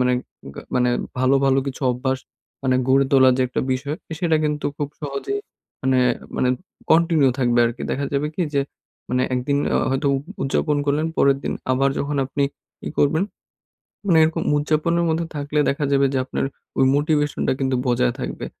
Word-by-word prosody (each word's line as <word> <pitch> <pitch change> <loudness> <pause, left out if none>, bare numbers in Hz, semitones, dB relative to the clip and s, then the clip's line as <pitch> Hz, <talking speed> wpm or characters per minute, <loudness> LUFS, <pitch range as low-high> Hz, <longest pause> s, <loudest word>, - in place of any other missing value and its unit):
মানে 125 0 +3 0.6
মানে 125 -1 +3 0.3
ভালো, 130 +2 +4
ভালো 135 0 +4
কিছু 135 +1 -5
অভ্যাস 130 +1 -1 0.4
মানে 130 -1 +2
গড়ে 135 +1 +5
তোলার 130 -1 +6
যে - - +3
একটা - - -2
বিষয় 140 +4 -3 0.2
সেটা 165 -3 +3
কিন্তু 150 -1 -1
খুব 145 - -2
সহজেই 145 - -3 0.4
মানে 130 -1 +3 0.4
মানে 125 - +2 0.4
কন্টিনিউ 160 -4 +4
থাকবে 120 -2 +2
আরকি। 120 +1 -5
দেখা 140 - -1
যাবে 140 +2 +1
কি 185 - +1
যে 140 - +3 0.5
মানে 125 +1 +2
একদিন 130 +3 0 0.2
অ - - +4
হয়তো 135 +2 0 0.4
উদযাপন 145 +2 +1
করলেন 150 +3 +1
পরের 140 0 +4
দিন - - -1 0.2
আবার 135 +2 +3
যখন 145 +1 -2
আপনি 140 +1 0 0.4
ই - - -2
করবেন 155 +6 +3 0.8
মানে 175 -5 +4
এরকম 160 +1 0
উদযাপনের 155 +3 +1
মধ্যে 165 +1 0
থাকলে 145 +1 -1
দেখা 140 +1 -1
যাবে 140 0 +4
যে - - +1
আপনার 130 - -2 0.3
ওই 135 - +4
মোটিভেশন 145 0 +1
টা - - +3
কিন্তু 130 -1 0
বজায় 125 0 +2
থাকবে। - - -4
140 Hz, 170 wpm, -22 LUFS, 130-150 Hz, 0.8 s, তোলার